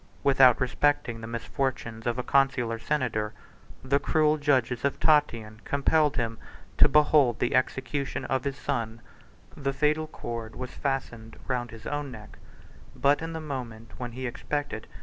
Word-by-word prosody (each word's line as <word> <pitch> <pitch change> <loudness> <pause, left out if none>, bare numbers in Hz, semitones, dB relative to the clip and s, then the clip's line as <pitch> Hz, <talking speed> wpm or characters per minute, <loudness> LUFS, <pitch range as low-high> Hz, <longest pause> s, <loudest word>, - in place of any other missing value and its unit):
Without 135 -3 +6
respecting 130 -2 +1
the 110 - -6
misfortunes 115 -1 -3
of 120 - 0
a 125 - -1
consular 125 -5 +2
senator, 115 -5 -1 0.5
the 140 +2 +2
cruel 155 0 +2
judges 130 -5 +1
of 140 - 0
Tatian 115 -9 +2
compelled 145 +1 +2
him 115 -2 -2 0.4
to - - +8
behold 145 -5 +4
the 120 - 0
execution 135 +2 -1
of 130 -1 -1
his 140 -1 -3
son: 115 -6 -3 0.5
the 135 -1 -2
fatal 155 +2 +1
cord 115 -5 -6
was 130 0 -6
fastened 120 -5 -4
round 125 -2 -1
his 115 -1 -12
own 145 -1 -3
neck; 110 -4 -11 0.6
but 140 +2 +3
in 165 0 -4
the 160 - -4
moment 120 -7 -6
when 120 -2 -5
he 130 +2 -5
expected. 145 -1 -3
130 Hz, 150 wpm, -27 LUFS, 115-145 Hz, 0.6 s, to